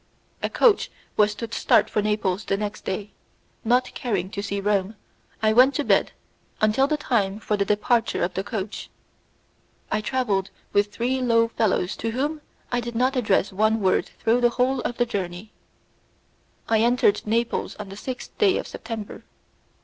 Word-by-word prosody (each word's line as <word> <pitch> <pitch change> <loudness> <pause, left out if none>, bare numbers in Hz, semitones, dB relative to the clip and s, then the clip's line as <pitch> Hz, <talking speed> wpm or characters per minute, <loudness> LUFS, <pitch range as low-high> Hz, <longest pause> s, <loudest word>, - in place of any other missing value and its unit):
A - - -1
coach 460 -4 +3 0.3
was 210 0 +3
to 230 0 -6
start - - +3
for 210 - 0
Naples 205 -2 -1
the 195 - 0
next 210 0 -5
day; 200 +2 -3 0.5
not 245 +2 +2
caring 195 -6 -2
to 200 - -4
see 200 -1 -3
Rome, 200 +1 0 0.5
I 215 0 +4
went 255 +4 +6
to 295 - 0
bed - - +2 0.5
until 215 +6 +3
the 305 +1 0
time 210 -8 0
for 215 - -1
the 200 -1 0
departure 210 +3 +1
of 180 +1 -1
the 190 - -2
coach. 205 -1 -5 1.0
I 215 - +1
travelled 215 -6 0 0.2
with 205 0 +2
three 250 +4 -1
low 230 -2 +3
fellows 210 -5 0
to 225 - -2
whom 290 +6 -2 0.3
I 245 - +1
did 240 0 -5
not 255 +3 +2
address 205 -5 +1
one 215 +3 +2
word 190 -3 +2
through 235 +2 +2
the 240 - +5
whole 255 +2 +1
of 240 - -3
the 240 - +2
journey. 190 -2 -5 1.2
I 225 -1 +3
entered 230 -3 +3
Naples 230 +2 -1
on 210 -2 -8
the 195 - -8
6th 250 +5 -6
day 395 -3 +4
of - - -3
September. 220 -3 -7
220 Hz, 170 wpm, -24 LUFS, 200-245 Hz, 1.2 s, went